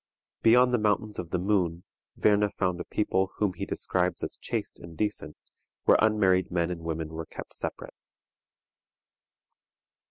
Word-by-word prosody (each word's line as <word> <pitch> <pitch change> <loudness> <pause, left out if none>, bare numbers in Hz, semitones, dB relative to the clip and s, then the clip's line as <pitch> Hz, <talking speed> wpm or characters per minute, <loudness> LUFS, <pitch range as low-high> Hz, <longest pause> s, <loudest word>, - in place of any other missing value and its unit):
Beyond 125 +2 +5
the 120 - +3
Mountains 105 0 0
of 85 -2 -5
the 90 - 0
Moon 90 -3 0 0.3
Werne 105 0 +3
found 90 -2 0
a - - -6
people 95 -2 0
whom 105 -3 0
he 85 - -5
describes 90 0 -1
as - - -2
chaste - - -3
and 85 -2 -11
decent, 105 -8 -2 0.5
where - - +5
unmarried 100 -4 +3
men 85 -1 0
and 85 -2 -5
women 80 -1 -3
were 80 0 -6
kept - - -9
separate. - - -5
95 Hz, 150 wpm, -28 LUFS, 85-105 Hz, 0.5 s, Beyond